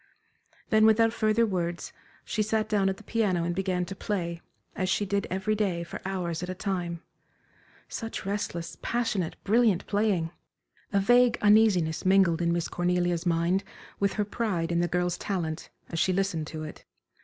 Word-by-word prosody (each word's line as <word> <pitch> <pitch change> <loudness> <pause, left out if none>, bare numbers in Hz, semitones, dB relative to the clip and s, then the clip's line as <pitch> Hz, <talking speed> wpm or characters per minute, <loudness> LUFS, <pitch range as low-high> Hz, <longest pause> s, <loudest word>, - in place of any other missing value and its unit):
Then 220 -1 +6
without 225 +1 +4
further 220 0 +2
words, 175 -4 -3 0.3
she 215 - -1
sat 215 0 0
down 205 -3 +2
at 190 - -3
the - - -14
piano 200 -7 0
and 175 +1 -1
began 185 -1 -1
to 195 - -7
play, 170 -4 -3 0.3
as 185 -1 -1
she 205 - +1
did 200 0 -1
every 190 +3 0
day 195 -5 0
for 170 - -8
hours 175 -4 -2
at 180 - -4
a 185 - -3
time. 175 -3 -3 0.8
Such 225 -4 -5
restless, 170 -5 -3
passionate, 225 -8 -1
brilliant 215 -3 +3
playing! 200 -6 +1 0.6
A 200 - +3
vague 245 +3 +4
uneasiness 205 -7 +4
mingled 185 -3 +4
in 170 0 +2
Miss 170 -1 0
Cornelia's 175 -1 0
mind 170 +3 +2 0.4
with 200 -1 +1
her 210 - 0
pride 195 -6 -1
in 170 - +1
the 175 - +2
girl's 180 +1 -1
talent, 170 -5 -3 0.2
as 165 - -3
she 185 - +3
listened 180 -5 -1
to 155 0 -6
it. 155 - -9
190 Hz, 170 wpm, -28 LUFS, 170-210 Hz, 0.8 s, Then